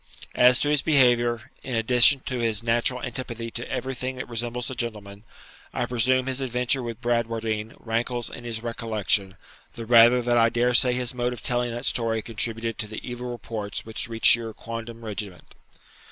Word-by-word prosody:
As 125 0 +6
to 145 - +1
his 150 -2 +3
behaviour, 120 -5 +2
in 130 - -4
addition 125 +4 +5
to 130 -1 -4
his 115 -2 -1
natural 120 +2 0
antipathy 120 -2 -5
to 120 - -6
everything 130 0 -3
that 125 - -6
resembles 120 +1 -3
a - - -4
gentleman, 105 -4 -6 0.5
I - - 0
presume 130 +2 +1
his 135 0 -2
adventure 125 +1 +1
with 120 -1 -6
Bradwardine 115 -2 -2
rankles 120 +1 -2
in 120 - -9
his 115 -1 -4
recollection, 110 -4 -1 0.4
the 115 - -6
rather 120 +1 +6
that 120 0 +2
I 115 0 +5
daresay 125 +1 +3
his 125 -1 -1
mode 125 0 -1
of 120 - -10
telling 120 0 0
that 120 +1 -5
story 115 -2 0
contributed 115 0 -2
to 105 - -1
the 110 0 -8
evil 125 0 -5
reports 110 -3 -5
which 110 +1 -3
reached 115 -1 +6
your 115 -2 -7
quondam 115 0 -8
regiment.' 100 -4 -6
120 Hz, 175 wpm, -25 LUFS, 115-125 Hz, 0.5 s, As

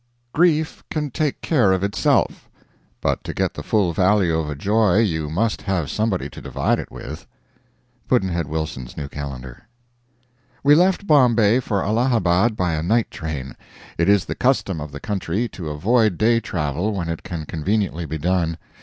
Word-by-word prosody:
Grief 160 -1 +2
can 150 -3 -2
take 150 +2 -1
care 125 - +3
of 95 0 +1
itself; 100 0 +1 0.5
but - - 0
to - - -6
get - - 0
the - - -6
full 100 -6 +1
value 95 -1 +3
of 80 -2 -1
a 75 - -3
joy 105 +4 +2
you 80 -9 +1
must 105 +8 0
have 95 -7 -1
somebody 105 -4 -1
to - - -11
divide - - 0
it - - -7
with. - - -8 0.8
Pudd'nhead 90 - +1
Wilson's 75 -5 -5
New 70 - -4
Calendar. 70 - -8 1.0
We 145 +1 +6
left 185 +5 +3
Bombay 120 - +4
for 105 -6 -1
Allahabad 110 -2 +2
by 90 -4 0
a 75 - -1
night 110 +7 +1
train. 75 -5 -5 0.4
It 85 - +3
is 100 -2 +4
the - - -3
custom 100 - 0
of 75 0 -7
the 70 - -7
country 100 +3 -2
to 85 -7 -6
avoid 105 +5 +2
day 115 +1 +3
travel 85 +2 -2
when 90 -4 -3
it 85 -1 -4
can 85 -5 -6
conveniently 85 +1 -1
be 80 +1 -4
done. 85 0 0
95 Hz, 170 wpm, -22 LUFS, 80-115 Hz, 1.0 s, We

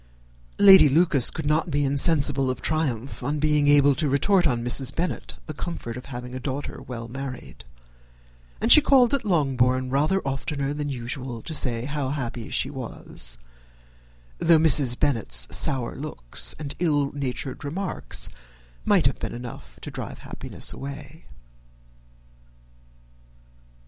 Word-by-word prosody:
Lady 190 -6 +8
Lucas 145 -4 +3
could 160 - -6
not 155 +4 +1
be 145 -1 0
insensible 140 -1 +2
of 130 - -3
triumph 140 -6 -2
on 145 +4 -2
being 150 -1 +1
able 145 -1 +5
to 150 +1 -1
retort 175 +6 +2
on 120 -4 -1
Mrs. 130 +2 0
Bennet 175 +1 -3
the 155 - -7
comfort 145 -7 -6
of 125 - -9
having 125 -2 -8
a 130 - -5
daughter 135 +2 -5
well 120 -3 -7
married; 130 - -8 0.9
and - - +2
she 305 - +11
called 265 -4 +4
at 280 - 0
Longbourn 130 - +1
rather 150 +8 +1
oftener 140 +1 -3
than 145 0 -4
usual 125 -2 -6
to 165 - -7
say 120 -5 -1
how 140 -1 -3
happy 120 -5 -5
she - - -1
was, - - -1 1.0
though 165 -1 +5
Mrs. 145 -6 +5
Bennet's 80 - +2
sour 130 -3 0
looks 130 - -3
and 145 -2 -6
ill 145 -5 +1
natured 135 -1 -5
remarks 185 +7 -2 0.6
might - - +2
have - - +1
been - - -5
enough 120 0 -10
to - - -7
drive - - -7
happiness - - -3
away. 140 +2 -9
140 Hz, 140 wpm, -24 LUFS, 125-155 Hz, 1.0 s, she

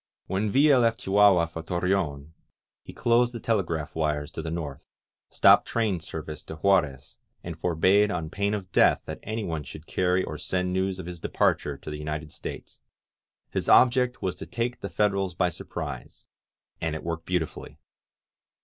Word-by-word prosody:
When 100 +3 -1
Villa 140 +3 +5
left 115 -1 +1
Chihuahua 95 -3 +5
for 80 0 -7
Torreon, 85 -4 -1 0.5
he - - -11
closed 120 0 +2
the - - -4
telegraph 85 -10 -1
wires 75 -2 -1
to - - -5
the 80 - -5
north, 80 -5 -5 0.4
stopped - - +5
train 110 -6 0
service 75 -1 -6
to - - -7
Juarez, 80 -6 +1 0.3
and 85 -1 -6
forbade 95 +5 +3
on 80 -4 -3
pain 100 +1 0
of 95 -3 -7
death - - +4
that - - -6
anyone 105 -8 -3
should 75 +3 -10
carry 90 +1 +1
or 75 - -6
send 90 +3 -1
news 95 0 0
of 95 - -7
his 90 -1 -7
departure 75 -2 0
to 75 - -8
the 75 - -6
United 75 0 -5
States. - - -8 0.7
His - - -2
object 125 0 +4
was 95 - -1
to - - -8
take 120 +1 -3
the 100 - -5
Federals 100 -3 0
by 90 -1 +2
surprise, 85 - -7 0.6
and 80 -1 -1
it 80 - -6
worked 85 -1 -4
beautifully. 90 -3 -3
90 Hz, 165 wpm, -26 LUFS, 80-100 Hz, 0.7 s, Villa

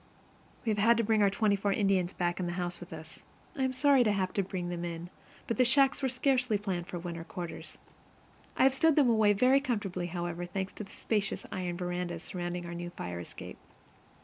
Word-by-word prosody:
We 220 - +2
have 225 +2 +3
our 200 - +5
twenty 205 0 +2
four 200 0 0
Indians 195 -3 +2
back 175 0 -1
in 180 - -1
the 175 - -2
house 175 -1 -3
with 175 - -11
us. 160 -1 -9 0.3
I 265 -1 +1
was 260 0 -4
sorry 280 -2 +5
to 215 - +2
have 190 -2 -1
to 200 - +2
bring 180 -2 -4
them 175 -1 -4
in, 170 +1 -5 0.3
but 230 - -2
the 255 - +6
shacks 275 +3 +3
were 265 - +1
scarcely 250 -3 +2
planned 185 -4 -3
for 180 - -5
winter 170 -1 -5
quarters. 175 0 -7 0.8
I - - +4
have 265 0 +6
stowed 320 +2 +4
them 275 -5 +5
away 215 -2 +4
very 255 +6 +5
comfortably, 205 -10 -2
however, 175 0 -4
thanks 190 +1 -3
to - - -6
the 195 - -13
spacious 205 -3 -2
iron 180 -2 -3
verandas 175 -1 -3
surrounding 175 -1 -4
our 170 - -6
new 175 0 -5
fire 90 - -6
escape. 85 - -9
195 Hz, 205 wpm, -31 LUFS, 175-230 Hz, 0.8 s, the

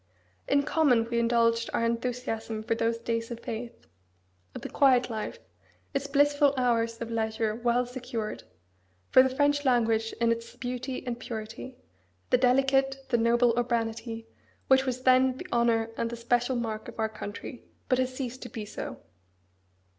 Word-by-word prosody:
In 280 0 +3
common 280 -7 +3
we 235 - +2
indulged 230 0 +2
our 230 - +1
enthusiasm 230 -2 -2
for 230 - 0
those 230 0 0
days 230 0 -2
of 235 -1 -6
faith; 235 - -6 0.7
of - - -7
the - - -3
quiet 255 -3 +4
life; 215 -1 -4 0.6
its 275 0 -1
blissful 285 0 +3
hours 230 -2 +1
of 230 0 -4
leisure 220 -1 -1
well 240 +2 +1
secured; 235 - -5 0.7
for 260 - +9
the 260 - +3
French 285 +2 +2
language 225 -4 +2
in 235 0 +1
its 230 0 -4
beauty 250 +1 -4
and 240 -1 -3
purity; 225 +2 -7 0.5
the 250 - +5
delicate, 270 +1 +2
the 240 - +3
noble 235 +1 +4
urbanity, 230 -1 -2 0.4
which 265 0 +5
was 255 0 -2
then 255 0 +4
the - - -7
honour 230 -1 +2
and 230 - -1
the 235 - -6
special 245 +2 +1
mark 225 -2 -3
of - - -10
our 220 -1 +1
country, 215 +3 -8 0.2
but 255 - +2
has 255 0 +1
ceased 255 -1 -5
to 245 - -7
be 220 -1 -6
so." 210 - -6
235 Hz, 160 wpm, -28 LUFS, 230-255 Hz, 0.7 s, for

